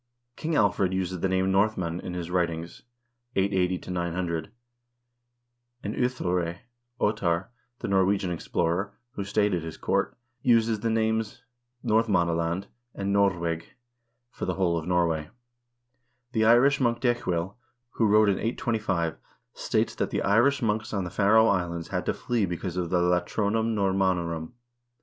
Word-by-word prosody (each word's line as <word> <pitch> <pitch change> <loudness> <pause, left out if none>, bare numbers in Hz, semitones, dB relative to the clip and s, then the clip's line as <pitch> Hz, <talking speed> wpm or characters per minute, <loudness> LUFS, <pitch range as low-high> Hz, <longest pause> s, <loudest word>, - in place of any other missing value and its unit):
King 160 0 -2
Alfred 100 -6 +2
uses 95 -1 -2
the 95 - 0
name 95 0 +1
Nordmenn 95 -4 +1
in 90 - -6
his 90 -1 -5
writings 85 -2 -2 0.5
(880 95 -2 0
900), 85 0 -2 1.3
and 105 - -3
Ohthere 90 -9 -1 0.4
(Ottar), 95 -4 0 0.3
the - - -5
Norwegian 95 -1 +2
explorer, 85 +3 -1
who 100 - -4
stayed 105 0 +1
at 85 - 0
his 80 0 -7
court, - - -1 0.2
uses 115 -3 +3
the 115 - -1
names 110 0 0 0.4
Nordmannaland 90 -5 +1 0.3
and 100 0 -1
Nordweg 85 -5 +1 0.7
for - - -5
the 90 - -1
whole 90 -2 +1
of 80 0 -3
Norway.2 85 -4 +1 1.0
The 110 -2 +2
Irish 135 +5 +5
monk 120 -2 +2
Decuil, 100 -7 0 0.4
who 115 - +1
wrote 105 +1 +5
in 100 - +2
825, 105 -8 -1 0.4
states - - 0
that - - -2
the - - -1
Irish 120 +7 +3
monks 110 0 -1
on 100 - 0
the 90 - -5
Faroe 110 +2 +5
Islands 85 -5 0
had - - -3
to - - +1
flee 115 -5 0
because 85 +1 -4
of 90 -2 -2
the 90 0 +2
Latronum 105 +5 +1
Normannorum. 95 -4 0
95 Hz, 140 wpm, -27 LUFS, 85-110 Hz, 1.3 s, Irish